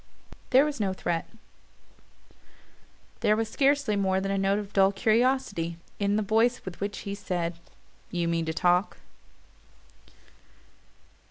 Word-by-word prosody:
But - - -16
there 265 +2 +6
was 295 -3 -3
no 195 -3 0
threat 170 -3 -2 1.9
there 210 - +3
was 225 0 -1
scarcely 275 -4 +2
more 190 -1 +1
than 195 +1 -2
a - - 0
note 195 +1 +2
of 205 -1 -6
dull 195 0 +4
curiosity 215 -6 +1 0.2
in 200 0 +1
the 215 - +1
voice 225 +4 +1
with 185 -2 -7
which 205 0 -3
he 200 - -5
said: 180 -4 -3 0.6
"You 175 -1 -1
mean 165 -1 0
to 160 - -1
talk?" 180 +3 +2
200 Hz, 140 wpm, -27 LUFS, 180-220 Hz, 1.9 s, there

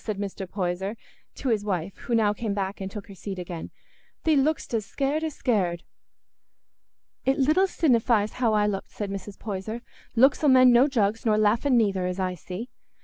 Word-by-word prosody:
said 215 -3 -3
Mr. 195 -2 -5
Poyser 190 +2 -2 0.4
to 265 - -3
his 215 -3 +1
wife, 190 -2 -2
who 235 - -2
now 210 -2 +3
came 210 -1 -3
back 195 0 -3
and 190 - -3
took 210 +1 -8
her 200 - -10
seat 195 0 -6
again. 175 -2 -6 0.5
"Thee 315 -1 +3
look'dst 285 -1 +1
as 225 -2 +1
scared 280 +8 -1
as 315 -3 -3
scared." 185 -9 0 1.4
"It 265 +1 +2
little 310 +8 +3
sinnifies 235 - +2
how 230 -3 +3
I 210 0 +3
looked," 200 -2 -2
said 205 -2 -5
Mrs. 195 0 -7
Poyser; 215 +3 -5 0.3
"looks 265 +6 +4
'ull 295 - +5
mend 255 -1 +7
no 245 +4 +6
jugs, 225 -5 0
nor 215 -2 +3
laughing 230 +5 +3
neither, 195 -5 +1
as 180 +1 -3
I 185 -1 0
see. 185 +7 -7
210 Hz, 190 wpm, -26 LUFS, 195-250 Hz, 1.4 s, mend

